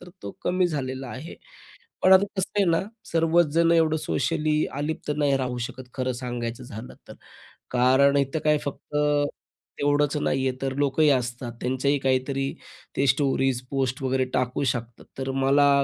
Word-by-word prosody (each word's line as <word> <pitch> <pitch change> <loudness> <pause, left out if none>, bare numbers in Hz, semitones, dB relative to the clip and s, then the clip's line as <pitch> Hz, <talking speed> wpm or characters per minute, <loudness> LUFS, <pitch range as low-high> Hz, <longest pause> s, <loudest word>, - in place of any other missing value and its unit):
तर 180 - -12
तो 100 - -5
कमी 180 0 +2
झालेला 135 -4 -4
आहे. 140 +8 -8 0.7
पण 185 - +6
आता 190 +1 +7
कसं 190 - -1
आहे 200 - +4
ना 165 - +3 0.3
सर्वच 165 0 +4
जण 165 0 +4
एवढं 160 -1 +3
सोशली 155 +1 0
अलिप्त 150 +1 -3
नाही 145 -2 +2
राहू 125 -2 -2
शकत 130 0 -10
खरं 130 0 -1
सांगायचं 120 0 -5
झालं 115 +1 -9
तर. - - -9 0.6
कारण 130 +3 +4
इथं 140 +3 0
काय 150 0 +4
फक्त 145 +1 -7 0.8
तेवढंच 145 +1 +2
नाही 135 -2 0
आहे 130 0 -2
तर 135 -1 -1
लोकही 145 +2 +3
असतात. 120 -1 -1
त्यांच्याही 130 +3 +1
काहीतरी 135 +1 0 0.4
ते 140 - +2
स्टोरीज 135 -1 +2
पोस्ट 135 0 -1
वगैरे 130 0 +1
टाकू 125 +1 0
शकतात. 120 -3 -3
तर 135 0 -2
मला 140 +1 +4
135 Hz, 160 wpm, -25 LUFS, 130-150 Hz, 0.8 s, आता